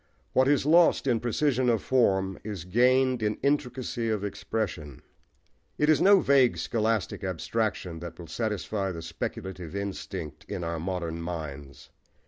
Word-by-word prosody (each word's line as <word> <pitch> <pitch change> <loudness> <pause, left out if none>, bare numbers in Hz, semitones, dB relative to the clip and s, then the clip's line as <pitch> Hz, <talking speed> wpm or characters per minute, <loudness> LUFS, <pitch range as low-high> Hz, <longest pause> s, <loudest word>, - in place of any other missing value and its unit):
What 130 0 +4
is 140 -1 +3
lost 165 0 +5
in 120 -4 +2
precision 125 +1 +1
of 115 -3 +1
form 95 -7 +2
is 100 -6 -5
gained 125 +5 +3
in 105 -1 0
intricacy 125 -4 -1
of 105 -2 -1
expression. 95 - -4 0.7
It 150 - +2
is 155 -1 +4
no 195 +1 +7
vague 135 -3 +4
scholastic 110 -4 -1
abstraction 95 -1 -2
that 85 0 -8
will 85 - -9
satisfy 100 +1 -2
the 85 -2 -7
speculative 90 +2 -6
instinct 100 -6 -5
in - - -5
our 85 -1 -3
modern 85 -1 -3
minds. 75 -5 -7
105 Hz, 140 wpm, -27 LUFS, 85-125 Hz, 0.7 s, no